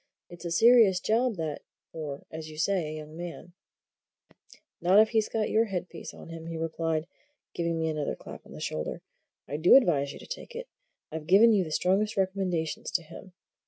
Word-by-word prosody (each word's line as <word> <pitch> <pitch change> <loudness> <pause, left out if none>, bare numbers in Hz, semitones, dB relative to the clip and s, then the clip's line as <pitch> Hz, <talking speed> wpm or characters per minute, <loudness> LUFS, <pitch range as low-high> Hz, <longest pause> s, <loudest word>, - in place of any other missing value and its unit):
"It's 175 0 -11
a - - -2
serious 225 -1 +6
job 230 +4 +1
that 160 -4 -4 0.3
for, 145 -3 -6
as 160 0 -7
you 155 - -11
say, 175 0 +1
a 155 0 -5
young 155 0 -9
fellow." 175 0 -7 1.3
"Not 185 +4 +5
if 220 0 +6
he's 220 -2 +1
got 220 -1 -1
your 225 +1 +4
headpiece 180 -4 -5
on - - -12
him," 165 0 -8
he 165 -1 -5
replied, 160 -1 -1 0.5
giving 170 -1 -1
me 160 0 0
another 155 -2 -2
clap - - -11
on - - -15
the - - -9
shoulder. 75 0 -4 0.4
"I 145 - -3
do 160 +3 +6
advise 150 - +4
you - - -9
to - - -12
take - - -8
it. - - -6 0.4
I've 155 -1 -6
given 215 +6 +7
you 200 -3 +3
the 160 - -6
strongest 195 +7 +1
recommendations 185 -4 -1
to 170 - +1
him. 180 +3 -12
170 Hz, 195 wpm, -28 LUFS, 160-200 Hz, 1.3 s, given